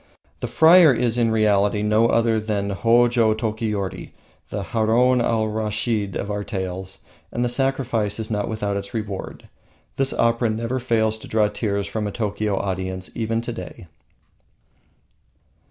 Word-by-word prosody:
The - - -3
friar 165 -1 +7
is 120 -2 +1
in 120 -2 +2
reality 105 -1 +2
no 105 +2 +3
other 115 -1 +2
than 105 -2 -2
Hojo 115 +1 +3
Tokiyori, 110 -3 -3 0.4
the 100 -1 -4
Haroun 120 +4 +2
Al 115 -2 +1
Raschid 105 -1 -1
of 100 - -3
our 100 0 -3
tales, 95 -2 -5 0.3
and 120 - -1
the - - +2
sacrifice 120 -5 -1
is 110 0 -4
not 105 -1 -1
without 105 -2 -2
its 100 +3 -6
reward. 105 -3 -5 0.5
This 135 0 +1
opera 115 0 +1
never 115 +4 -2
fails 110 -3 0
to - - -11
draw 110 -1 +2
tears 100 -2 -2
from 110 -2 -3
a - - -4
Tokio 105 -1 -2
audience 95 -1 -4
even 115 0 -1
to 120 - -5
day. 90 -3 -9
110 Hz, 150 wpm, -22 LUFS, 100-115 Hz, 0.5 s, friar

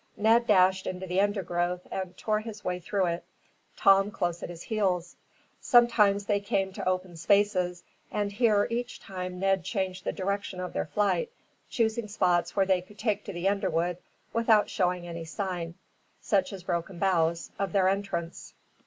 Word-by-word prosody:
Ned 230 +3 +4
dashed 190 -2 +4
into 185 0 -4
the 185 +1 +1
undergrowth 180 -3 -1
and 185 -1 -4
tore 215 -1 0
his 215 -1 -8
way 180 0 -1
through 190 +2 0
it, 170 0 -2 0.5
Tom 195 +1 +5
close 175 -4 -2
at - - -5
his 175 -1 -8
heels. 185 -6 -1 0.4
Sometimes 215 -5 +4
they 205 -1 +1
came 195 -2 -1
to 185 - -2
open 185 -1 -2
spaces, 185 -1 +2 0.3
and 205 -1 -1
here 210 -1 +3
each 240 +1 -3
time 180 -1 -6
Ned 195 -1 +2
changed 190 -1 -3
the - - -1
direction 200 -1 -3
of 180 0 -5
their - - -2
flight, 210 - +1 0.4
choosing 225 -1 0
spots 180 -4 +1
where 195 -1 +3
they 190 -1 +2
could 205 +3 -17
take 215 -2 -1
to - - -5
the 175 +2 -1
underwood 180 -3 0 0.4
without 225 -2 +3
showing 180 -2 0
any 170 -1 -6
sign, 170 -1 -4 0.4
such 195 -3 +1
as 190 -3 -8
broken 175 +1 -3
boughs, 170 -3 +1
of 195 -2 -1
their 190 0 +3
entrance. 185 -4 -3
190 Hz, 170 wpm, -28 LUFS, 180-205 Hz, 0.5 s, Tom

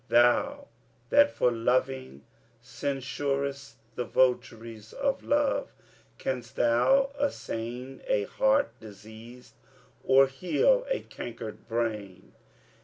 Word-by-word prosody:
Thou, 275 - +3 0.4
that 290 0 +6
for 125 - +1
loving 125 - -1 0.4
censurest 140 +2 -3 0.2
the 125 - -2
votaries 115 -3 -1
of 275 -1 -1
love, 290 -1 +1 0.5
Canst 125 -3 -4
thou 265 - +3
assain 125 - -4
a 105 - +2
heart 270 - +2
diseased 110 +3 -13 0.5
or 135 +1 +6
heal 485 - +1
a - - 0
cankered 115 -2 -8
brain? 105 -5 -3
125 Hz, 95 wpm, -28 LUFS, 115-180 Hz, 0.5 s, that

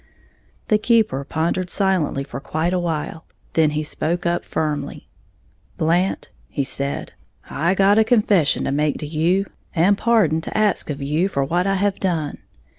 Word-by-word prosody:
The 215 -2 +4
keeper 215 - +2
pondered 170 +5 -1
silently 185 -9 +1
for 135 -1 -7
quite 160 +5 -2
a 180 - +1
while; 160 -1 -3 0.3
then 160 -2 +4
he 155 - 0
spoke 170 +3 -2
up, 175 0 0
firmly. 150 -2 -3 0.7
"Blant," 175 +4 0 0.2
he 140 - -1
said, 140 +1 -3 0.4
"I 170 +6 +1
got 200 +2 +4
a - - +6
confession 210 - +2
to - - -1
make 150 +1 0
to - - -6
you, 170 +6 +1 0.3
and 180 +5 +4
pardon 200 -8 +2
to - - -5
ax 210 -6 +1
of 140 -1 -4
you, 155 +6 +1
for 140 -7 0
what 175 +7 0
I 195 - +2
have 200 0 0
done. 165 -6 -2
170 Hz, 165 wpm, -21 LUFS, 150-195 Hz, 0.7 s, a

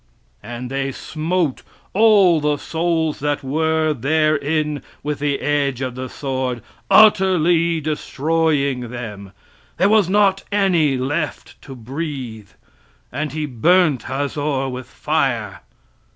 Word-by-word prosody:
"And 120 +3 -7
they 135 0 -2
smote 160 +1 -2 0.3
all 200 -6 +5
the 150 0 +1
souls 160 0 -1
that 145 0 -1
were 160 +2 +1
therein 150 +2 0 0.2
with 150 0 -3
the 145 -1 -1
edge 140 -3 0
of 130 -2 -3
the 130 +1 -6
sword, 130 -4 -3 0.3
utterly 175 -6 +4
destroying 150 -3 -1
them; 105 -5 -7 0.5
there 190 +4 +3
was 210 -4 +4
not 195 -1 +3
any 175 -9 +2
left 155 +4 -4
to 135 - -10
breathe; 125 - -6 0.6
and 150 +3 -3
he 155 -1 -2
burnt 150 +2 +2
Hazor 140 0 -2
with 125 -1 -7
fire." 130 -10 -1
150 Hz, 115 wpm, -20 LUFS, 130-160 Hz, 0.6 s, all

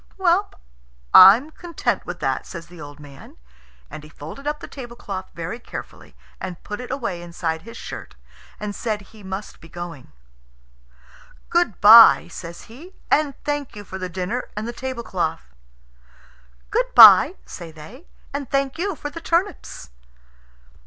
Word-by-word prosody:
"Well, 380 +1 +2 0.6
I'm 225 +11 +8
content 340 0 -3
with - - -6
that," - - -2
says 170 -3 -8
the 170 -1 -14
old 145 0 -11
man. 140 -2 -14 0.5
And 150 - -10
he 150 - -13
folded 160 - -10
up 300 0 -2
the - - -9
tablecloth 235 -7 -8
very 170 +8 -5
carefully - - -10 0.2
and 185 -2 -7
put 210 +3 -6
it 250 - -9
away 235 -10 -4
inside 170 -2 -4
his 230 +6 -11
shirt, - - -9 0.4
and 210 -1 -5
said 215 -1 -3
he 210 +2 -17
must 190 +1 -7
be 165 - -14
going. 170 - -9 1.4
"Good 345 - +1
bye," 225 -2 +9
says 170 0 -9
he, 315 - -14 0.2
"and 295 -3 +2
thank 290 -4 -3
you 205 - -8
for 190 -1 -8
the 185 -1 -4
dinner 190 +7 -4
and 215 +2 -3
the 240 - -5
tablecloth." 195 - -4 1.2
"Good - - -1
bye," - - +9
say 165 - -9
they, 165 - -14 0.3
"and 280 -2 -5
thank 275 +2 -1
you 390 0 -2
for 295 -1 -7
the 330 - -8
turnips." 340 - -2
210 Hz, 150 wpm, -22 LUFS, 175-275 Hz, 1.4 s, bye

